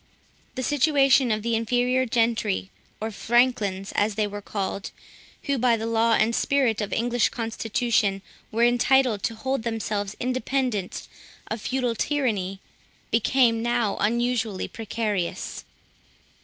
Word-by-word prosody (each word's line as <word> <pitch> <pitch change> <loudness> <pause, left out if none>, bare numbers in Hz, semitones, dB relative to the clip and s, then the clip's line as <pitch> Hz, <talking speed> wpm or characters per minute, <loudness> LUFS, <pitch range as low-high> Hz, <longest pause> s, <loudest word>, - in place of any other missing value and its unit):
The 260 - -3
situation 275 -2 +3
of 215 -1 0
the 230 0 0
inferior 245 +3 +1
gentry, 225 -4 0 0.3
or 220 +1 -3
Franklins, 220 -4 +1
as 205 0 0
they 215 0 +1
were 205 0 -6
called, 195 -1 -4 0.5
who, 280 -2 -1
by 240 -1 +3
the 225 - -4
law 230 0 +2
and 220 +1 +3
spirit 255 -4 +1
of 205 - -2
the - - -2
English 240 0 +2
constitution, 225 -3 -1 0.3
were 230 +2 +1
entitled 245 -2 +3
to 225 - -2
hold 265 +3 -2
themselves 215 -3 -3
independent 255 -5 -2 0.4
of 220 0 -3
feudal 250 -1 -1
tyranny, 215 -8 -1 0.5
became 230 0 +3
now 235 -3 0
unusually 230 -2 0
precarious. 210 -5 -3
230 Hz, 130 wpm, -25 LUFS, 210-250 Hz, 0.5 s, situation